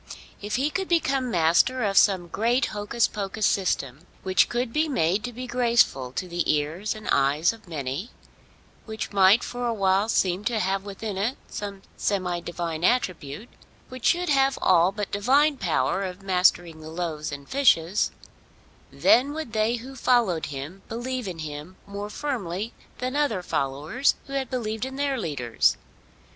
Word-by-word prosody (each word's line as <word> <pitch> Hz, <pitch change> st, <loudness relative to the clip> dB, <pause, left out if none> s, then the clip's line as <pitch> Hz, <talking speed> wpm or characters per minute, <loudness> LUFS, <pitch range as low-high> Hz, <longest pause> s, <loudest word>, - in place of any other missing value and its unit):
If 205 Hz, +1 st, -3 dB
he 275 Hz, +5 st, 0 dB
could 385 Hz, +2 st, -2 dB
become 275 Hz, -7 st, +1 dB
master 180 Hz, +8 st, +3 dB
of 200 Hz, -2 st, 0 dB
some 190 Hz, -3 st, +4 dB
great 235 Hz, +8 st, +1 dB
hocus 210 Hz, +3 st, 0 dB
pocus 205 Hz, +1 st, -3 dB
system 160 Hz, -5 st, 0 dB, 0.2 s
which 185 Hz, -1 st, +3 dB
could 240 Hz, -1 st, -2 dB
be 310 Hz, +1 st, +1 dB
made 190 Hz, -, +1 dB
to 245 Hz, -, -4 dB
be 250 Hz, +2 st, -7 dB
graceful 235 Hz, -, +2 dB
to 185 Hz, -, -3 dB
the 175 Hz, -1 st, 0 dB
ears 155 Hz, +8 st, -1 dB
and 215 Hz, -, -9 dB
eyes 140 Hz, +7 st, +3 dB
of 225 Hz, -3 st, -16 dB
many, 145 Hz, -, -4 dB, 0.8 s
which 220 Hz, -1 st, -5 dB
might 195 Hz, +3 st, +6 dB
for 245 Hz, 0 st, -3 dB
awhile 200 Hz, -2 st, +1 dB
seem 185 Hz, -2 st, +1 dB
to 235 Hz, -1 st, 0 dB
have 195 Hz, -1 st, -1 dB
within 200 Hz, 0 st, -5 dB
it 230 Hz, +7 st, -1 dB
some 200 Hz, -2 st, -6 dB
semi 185 Hz, -3 st, -1 dB
divine 170 Hz, -1 st, -4 dB
attribute, 185 Hz, -, 0 dB, 0.4 s
which 255 Hz, -2 st, -8 dB
should 355 Hz, 0 st, +2 dB
have 270 Hz, -1 st, +3 dB
all 180 Hz, 0 st, +4 dB
but 205 Hz, 0 st, -4 dB
divine 275 Hz, +8 st, +3 dB
power 190 Hz, -1 st, 0 dB
of 185 Hz, 0 st, -5 dB
mastering 180 Hz, -3 st, +2 dB
the 155 Hz, -, -9 dB
loaves 160 Hz, -3 st, -4 dB
and 140 Hz, -1 st, -8 dB
fishes, 210 Hz, -9 st, +3 dB, 0.8 s
then 270 Hz, +5 st, +4 dB
would 310 Hz, -7 st, -6 dB
they 220 Hz, +2 st, +2 dB
who 255 Hz, +3 st, -9 dB
followed 235 Hz, -10 st, +2 dB
him 145 Hz, +7 st, -7 dB
believe 245 Hz, 0 st, -3 dB
in 180 Hz, -3 st, -5 dB
him 155 Hz, +3 st, -7 dB
more 200 Hz, +1 st, -6 dB
firmly 215 Hz, -6 st, -3 dB, 0.2 s
than 255 Hz, +2 st, -3 dB
other 280 Hz, -11 st, 0 dB
followers 145 Hz, -, 0 dB
who 275 Hz, -, -9 dB
had 270 Hz, -2 st, -2 dB
believed 220 Hz, -3 st, -3 dB
in 265 Hz, +1 st, -4 dB
their 280 Hz, -2 st, -1 dB
leaders. 130 Hz, -, +1 dB
200 Hz, 160 wpm, -25 LUFS, 175-245 Hz, 0.8 s, might